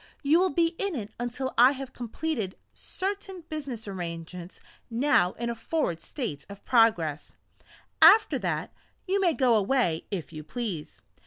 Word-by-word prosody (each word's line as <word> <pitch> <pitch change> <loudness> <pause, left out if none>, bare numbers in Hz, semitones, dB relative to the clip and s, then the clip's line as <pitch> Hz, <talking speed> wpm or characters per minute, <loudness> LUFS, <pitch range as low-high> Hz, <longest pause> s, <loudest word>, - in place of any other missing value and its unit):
You 300 +4 +5
will 375 +1 +3
be 330 +3 +1
in 395 -4 -1
it 220 -3 -5
until 245 +2 -3
I 250 +3 +8
have 270 -1 -7
completed 235 -4 -3 0.2
certain 385 -2 -4
business 275 -8 -5
arrangements 175 -1 -6 0.3
now 230 -7 +3
in 235 - -4
a - - -2
forward 230 - -2
state 220 - -5
of 200 0 -11
progress 215 - +2 0.7
after 425 +2 +7
that, - - -2 0.3
you 395 +2 +1
may 345 -5 +3
go 255 -3 +3
away 210 -6 +1
if 180 -5 -5
you 155 -1 -7
please. 200 -6 -5
240 Hz, 150 wpm, -27 LUFS, 185-305 Hz, 0.7 s, I